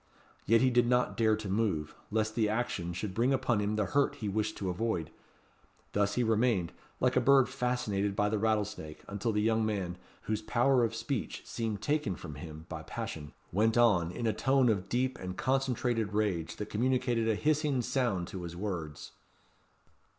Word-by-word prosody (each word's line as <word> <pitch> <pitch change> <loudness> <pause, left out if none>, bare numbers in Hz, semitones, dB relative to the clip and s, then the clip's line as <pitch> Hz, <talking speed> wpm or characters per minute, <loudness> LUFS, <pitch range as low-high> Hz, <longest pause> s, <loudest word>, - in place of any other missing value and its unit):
Yet 115 +1 +5
he 130 0 +4
did 120 -1 +4
not 125 0 +2
dare 110 -2 +3
to 110 -1 -6
move, 95 -7 0 0.2
lest 110 0 0
the 110 -2 +1
action 105 -6 -1
should 95 +3 -4
bring 120 +6 +2
upon 130 -4 +1
him 105 +1 0
the 105 -1 +1
hurt 140 +5 +1
he 105 - -5
wished 105 +2 -1
to 95 -2 -2
avoid. 90 -4 -2 0.8
Thus 105 0 +1
he 125 - +2
remained, 110 -6 +1 0.3
like 125 0 +2
a 130 - +4
bird 135 0 +5
fascinated 125 -6 -1
by 105 - +2
the 105 0 0
rattlesnake, 105 -7 -1
until 100 +3 -2
the 105 -1 +1
young 110 0 +2
man, 95 -5 -2 0.2
whose 110 0 -2
power 120 +3 +3
of 115 -1 0
speech 115 +2 -3
seemed 110 -3 -3
taken 145 -10 0
from 75 - -8
him 80 +2 -9
by 80 -3 -6
passion, 75 0 -6 0.2
went 110 +4 +2
on, 100 -8 +4
in 115 - -4
a 110 - +2
tone 135 -2 +3
of 100 -3 0
deep 130 +2 0
and 90 0 -6
concentrated 125 -5 0
rage, 100 -6 0
that 105 - -6
communicated 120 0 +1
a 110 - +2
hissing 150 -1 +1
sound 115 -10 0
to 95 - -6
his 85 -1 -6
words. 85 -6 -5
110 Hz, 185 wpm, -31 LUFS, 95-120 Hz, 0.8 s, Yet